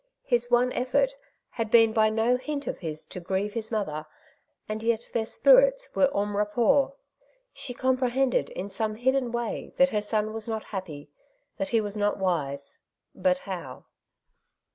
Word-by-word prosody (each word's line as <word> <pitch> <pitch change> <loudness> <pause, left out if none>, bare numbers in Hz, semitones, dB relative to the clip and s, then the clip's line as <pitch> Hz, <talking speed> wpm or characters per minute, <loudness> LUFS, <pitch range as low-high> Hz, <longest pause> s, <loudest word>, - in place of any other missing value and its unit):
His 240 -2 0
one 245 +1 +3
effort 265 - +1 0.4
had 230 -3 -3
been 225 -1 +6
by 220 -1 +4
no 225 +3 +2
hint 280 +2 -4
of - - -4
his 155 -3 -5
to - - -8
grieve 190 +4 -2
his 220 0 -3
mother, 155 -8 -2 0.6
and 215 0 -4
yet 230 0 0
their 220 -1 0
spirits - - +4
were 275 - +4
en 205 0 -1
rapport. 220 +7 +2 0.6
She 245 -3 -5
compre 255 0 +1
hended 265 +1 +1
in 190 - -5
some 215 +2 -2
hidden 255 +1 +1
way 235 -1 -4
that 270 0 +5
her 210 -5 0
son 215 +1 -1
was 225 0 -5
not 220 -1 -3
happy, 155 -8 -7 0.5
that 290 -1 -2
he 230 - +3
was 205 -1 -3
not 205 0 0
wise; 145 -7 -2 0.3
but 275 -1 +1
how 180 - -7
225 Hz, 165 wpm, -27 LUFS, 205-255 Hz, 0.6 s, been